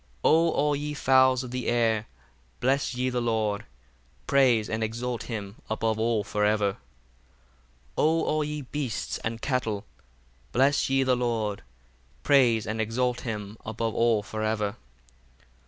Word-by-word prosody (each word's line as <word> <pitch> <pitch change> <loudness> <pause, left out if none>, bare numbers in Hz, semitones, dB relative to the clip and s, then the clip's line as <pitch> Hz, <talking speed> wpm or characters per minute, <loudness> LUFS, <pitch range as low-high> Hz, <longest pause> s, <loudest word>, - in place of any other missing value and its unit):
58 - - +5
O 165 +1 +5
all 150 -2 +1
ye 150 +1 -3
fowls 130 -2 +4
of 125 - -7
the 125 0 -3
air, 115 -2 +1 0.5
bless 135 0 +1
ye 130 +1 0
the 125 0 -1
Lord: 110 -3 0 0.6
praise 125 -6 +3
and 110 0 -2
exalt 120 +2 -3
him 105 -3 -6
above 110 0 0
all 110 -2 +1
for 105 +1 -2
ever. 105 -1 +2
59 95 - -16 1.2
O 160 +2 +3
all 155 0 +1
ye 150 0 -4
beasts 130 -4 -3
and 115 0 -4
cattle, 115 -7 -1 0.7
bless 135 +2 +3
ye 135 0 +3
the 130 -1 +3
Lord: 115 -4 -1 0.6
praise 120 -6 +4
and 110 +1 -2
exalt 125 +3 -1
him 105 -2 -5
above 110 0 -3
all 115 -3 +2
for 110 +1 -5
ever. 105 -2 -1
115 Hz, 150 wpm, -27 LUFS, 110-130 Hz, 1.2 s, 58